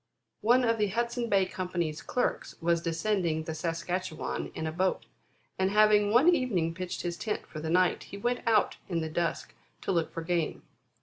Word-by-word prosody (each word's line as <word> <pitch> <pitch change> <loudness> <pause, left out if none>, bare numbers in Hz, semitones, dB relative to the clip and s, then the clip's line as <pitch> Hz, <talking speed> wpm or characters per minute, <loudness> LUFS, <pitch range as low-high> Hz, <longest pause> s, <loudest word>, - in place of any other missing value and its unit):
One 245 +4 +4
of 230 -2 +2
the 210 - +3
Hudson 235 +3 -1
Bay 195 -2 +4
Company's 175 -4 -3
clerks 250 - -2
was 170 0 +1
descending 165 -1 0
the 160 - -4
Saskatchewan 170 +1 -3
in 160 - -3
a 160 - -1
boat, 185 +3 0 0.5
and 190 0 +3
having 210 0 +5
one 245 +9 +5
evening 200 - 0
pitched 185 +1 -5
his 175 -1 -3
tent 210 +2 -3
for 155 - -8
the 160 +1 -4
night, 180 +1 +2
he 200 - -9
went 245 +4 0
out 225 - +3
in 170 -3 0
the 160 - -3
dusk 170 +1 -2 0.3
to - - -1
look 170 -3 0
for 165 - -5
game. 170 -1 -1
185 Hz, 185 wpm, -29 LUFS, 165-215 Hz, 0.5 s, having